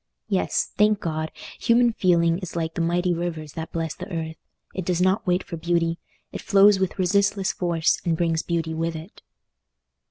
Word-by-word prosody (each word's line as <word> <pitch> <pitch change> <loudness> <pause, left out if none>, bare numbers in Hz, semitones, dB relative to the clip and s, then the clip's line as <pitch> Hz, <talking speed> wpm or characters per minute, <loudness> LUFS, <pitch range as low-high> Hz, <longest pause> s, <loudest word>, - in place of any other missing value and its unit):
Yes! 190 -3 0
Thank 210 -1 +4
God; 155 -1 -3 0.3
human 235 0 +3
feeling 170 -3 +2
is 185 -3 -7
like 165 -1 -2
the - - -2
mighty 175 +2 +1
rivers 165 -3 -4
that 160 0 -6
bless 165 -2 -2
the 185 +3 -9
earth: 160 -1 -4 0.4
it 185 - -3
does 175 0 0
not 185 +3 +2
wait 180 +1 +2
for 170 - -7
beauty—it 170 0 -3
flows 200 0 +5
with 190 -1 -1
resistless 195 +1 +2
force 170 -2 +1
and 165 -2 0
brings 165 -1 +1
beauty 165 -2 -2
with 165 +1 -2
it. 160 +6 -10
170 Hz, 170 wpm, -24 LUFS, 165-190 Hz, 0.4 s, flows